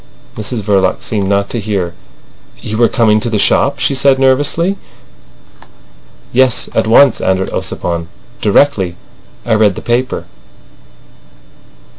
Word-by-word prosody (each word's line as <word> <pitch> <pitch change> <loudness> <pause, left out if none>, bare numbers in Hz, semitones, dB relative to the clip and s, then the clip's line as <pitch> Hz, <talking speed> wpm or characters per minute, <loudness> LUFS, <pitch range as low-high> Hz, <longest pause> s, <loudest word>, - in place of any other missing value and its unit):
Mrs 110 +1 -5
Verloc 95 -2 +1
seemed 100 -3 -2
not 100 0 +1
to 120 - -2
hear. 100 -5 -3 0.7
"You 110 +1 -5
were 120 - +4
coming 110 -3 +2
to 120 - -2
the 110 - -1
shop?" 140 +7 +2
she 135 +1 0
said 135 +1 +3
nervously. 145 +8 +1 1.6
"Yes; 130 0 +2
at - - 0
once," 125 +2 +4
answered 95 0 0
Ossipon. 85 -1 -3 0.3
"Directly 100 -5 +2 0.5
I 115 - +1
read 105 -3 +3
the - - -7
paper." 125 +2 -1
110 Hz, 125 wpm, -13 LUFS, 100-130 Hz, 1.6 s, were